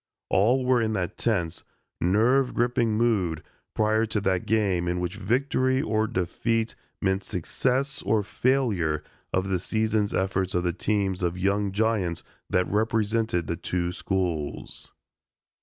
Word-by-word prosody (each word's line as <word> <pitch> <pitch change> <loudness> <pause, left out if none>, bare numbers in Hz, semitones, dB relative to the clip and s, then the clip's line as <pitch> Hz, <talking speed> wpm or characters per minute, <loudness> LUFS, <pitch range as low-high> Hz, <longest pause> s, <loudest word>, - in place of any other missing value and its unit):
All 125 +7 +3
were 125 -2 +3
in 110 -1 0
that 95 -1 -2
tense, 85 -8 -1 0.4
nerve 120 +9 +3
gripping 120 -2 +1
mood 95 -9 +1 0.3
prior 110 +1 +2
to 105 - 0
that 95 -2 0
game 95 -5 +1
in 90 0 0
which 90 0 -2
victory 130 +5 +1
or 110 -3 +1
defeat 110 +5 -1 0.3
meant 95 0 +1
success 130 - -1
or 105 +1 +1
failure 100 - +1 0.3
of 95 +1 0
the 95 -2 +1
season's 110 +1 0
efforts 95 -1 0
of 90 - +1
the 90 -1 0
teams 95 0 0
of 90 0 -1
young 100 +2 +1
giants 100 -5 0 0.3
that 90 0 +2
represented 110 -3 +1
the 85 - -2
two 90 +1 -2
schools. 90 -5 -3
100 Hz, 140 wpm, -26 LUFS, 90-115 Hz, 0.4 s, All